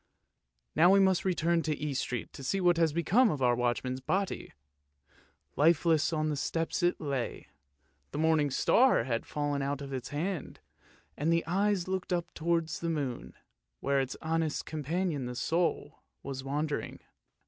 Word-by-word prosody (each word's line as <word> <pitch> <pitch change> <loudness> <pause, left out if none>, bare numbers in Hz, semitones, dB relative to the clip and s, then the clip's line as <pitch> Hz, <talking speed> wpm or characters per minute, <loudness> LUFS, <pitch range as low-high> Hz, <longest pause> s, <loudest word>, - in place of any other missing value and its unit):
Now 170 +4 +6
we 195 +1 +6
must 190 -2 +3
return 170 -2 +2
to 155 -2 -2
East 140 -3 -2
Street 125 -3 -4
to 140 - -9
see 195 +9 0
what 175 -2 +3
has 165 -2 +3
become 200 - +3
of 150 - -1
the 125 -2 +3
watchman's 125 +2 -1
body. 190 +7 -2 1.0
Lifeless 160 +1 +3
on 155 -1 0
the 150 - -1
steps 165 +5 -2
it 175 0 +2
lay; 135 - -3 0.6
the - - -6
Morning 155 -2 +3
Star 255 - +4
1 - - +1
had 115 -3 -2
fallen 145 -1 -1
out 140 0 -2
of 140 -1 -7
its 130 -1 -4
hand, 160 +3 -3 0.6
and 155 +3 0
the 170 0 +2
eyes 195 +2 +1
looked 185 -1 -3
up 175 -1 -1
towards 165 -1 -1
the 170 - -2
moon, 140 -7 -3 0.4
where 140 0 +1
its 130 -1 -4
honest 160 -1 -1
companion 155 -1 -2
the 125 - -5
soul 150 +1 -1 0.2
was 135 -1 -5
wandering. 145 +2 -3
155 Hz, 165 wpm, -30 LUFS, 140-170 Hz, 1.0 s, Now